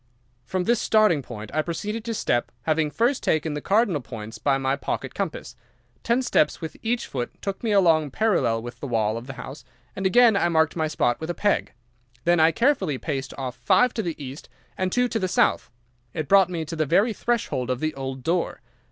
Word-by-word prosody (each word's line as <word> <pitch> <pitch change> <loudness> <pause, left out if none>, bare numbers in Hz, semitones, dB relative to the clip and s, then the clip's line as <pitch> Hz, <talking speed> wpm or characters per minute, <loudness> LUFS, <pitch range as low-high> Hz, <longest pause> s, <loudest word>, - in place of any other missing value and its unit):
"From 185 +6 -1
this 235 +3 +2
starting 215 -9 +3
point 110 -4 -9
I 155 - +2
proceeded 210 +7 -4
to 230 -1 -2
step, 120 - 0
having 155 +2 +1
first 240 - +1
taken 155 0 0
the 150 - -4
cardinal 195 - +2
points 110 -1 -8
by 140 -1 +2
my 135 0 0
pocket 140 - -4
compass. - - -4 0.5
Ten 240 +2 +1
steps 150 -10 +2
with 160 -1 -6
each 235 +1 -1
foot 125 -3 -5
took 195 -1 -4
me 225 - 0
along 165 -7 +4
parallel 130 - +1
with 120 0 -8
the 140 - -5
wall 110 -3 0
of 115 +2 -7
the 135 - -6
house, 135 +3 -9 0.3
and 190 0 0
again 235 +2 +5
I 185 -3 +2
marked 160 -1 +2
my 160 -2 0
spot 120 -5 0
with 160 - -5
a 175 - -2
peg. 205 -1 0 0.5
Then 175 +2 +3
I 160 +1 +6
carefully 200 - +1
paced 135 -2 -4
off 130 -2 -4
five 235 - +3
to 225 - -1
the 170 -6 -3
east 135 +1 -8 0.3
and 185 0 -1
two 245 +3 +2
to 230 - -2
the 185 - 0
south. 180 -7 +2 0.5
It 155 -2 -3
brought 195 -2 +5
me 165 -3 -3
to 165 +2 -6
the 155 -2 0
very 200 - +3
threshold 210 - -1
of 130 -1 -1
the 155 +1 -1
old 135 -2 -6
door. 170 +3 -1
160 Hz, 215 wpm, -24 LUFS, 135-205 Hz, 0.5 s, I